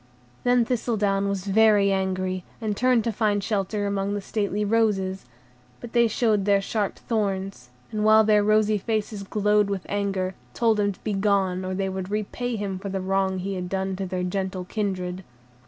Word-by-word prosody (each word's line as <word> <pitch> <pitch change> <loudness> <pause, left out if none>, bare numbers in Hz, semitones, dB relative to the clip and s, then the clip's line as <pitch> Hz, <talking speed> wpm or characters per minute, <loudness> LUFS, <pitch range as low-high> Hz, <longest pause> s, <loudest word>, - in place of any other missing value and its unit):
Then 245 -1 +3
Thistledown 210 -5 0
was 195 -1 -3
very 205 -1 +4
angry, 185 -1 -1 0.2
and 215 -3 -2
turned 250 0 +3
to 230 - 0
find 205 -2 0
shelter 205 0 -1
among 200 0 -1
the - - -1
stately 205 0 -1
roses; 200 -3 +1 0.5
but 240 -1 -9
they 235 -1 +5
showed 215 -3 +1
their 200 -1 +4
sharp 205 +1 -2
thorns, 195 - -2 0.2
and, 215 -1 -1
while 215 0 +6
their 210 -1 +4
rosy 215 0 +3
faces 215 0 -2
glowed 210 +1 +2
with 195 -2 -3
anger, 195 -2 -1 0.2
told 225 -3 +2
him 205 0 +2
to - - -23
begone, 195 -3 +1
or 185 0 -3
they 195 0 -1
would 190 0 -4
repay 215 +4 -2
him 200 -3 -3
for 200 +1 -5
the 195 0 -2
wrong 190 0 0
he 195 +2 -3
had 180 -1 -4
done 190 0 -1
their 185 -1 -3
gentle 185 0 -3
kindred. 185 -2 -3
200 Hz, 175 wpm, -25 LUFS, 190-215 Hz, 0.5 s, while